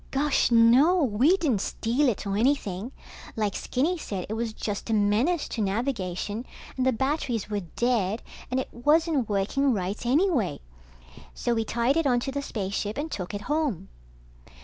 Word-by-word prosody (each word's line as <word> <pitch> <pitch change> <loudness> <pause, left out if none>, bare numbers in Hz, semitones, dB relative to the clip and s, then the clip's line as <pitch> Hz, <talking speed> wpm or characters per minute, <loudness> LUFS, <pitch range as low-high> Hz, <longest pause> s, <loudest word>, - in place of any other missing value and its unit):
Gosh 280 +1 +2
no, 250 +10 +5
we 265 - +3
didn't 270 - 0
steal 250 +8 +1
it 215 - -3
or 195 0 -1
anything. 220 -3 0 0.4
Like 210 -3 -1
Skinny 325 +8 -1
said, 195 - -4
it - - -2
was 225 0 -2
just 210 0 -5
a 225 - +2
menace 220 +12 +2
to 225 - -3
navigation, 205 -1 -2 0.3
and 260 0 0
the - - +5
batteries 255 -4 -1
were 205 - 0
dead, 215 +3 -1 0.3
and 255 - 0
it 260 - -4
wasn't 295 0 +2
working 215 +7 +1
right 195 +1 -3
anyway. 255 - +1 0.8
So 240 - 0
we 225 -1 0
tied 240 +6 +1
it 330 -3 +2
onto 250 +1 +1
the 280 +1 -2
spaceship 205 -2 -3
and 305 +2 -3
took 185 +1 -4
it 205 - -4
home. 295 - -1
235 Hz, 165 wpm, -26 LUFS, 205-280 Hz, 0.8 s, no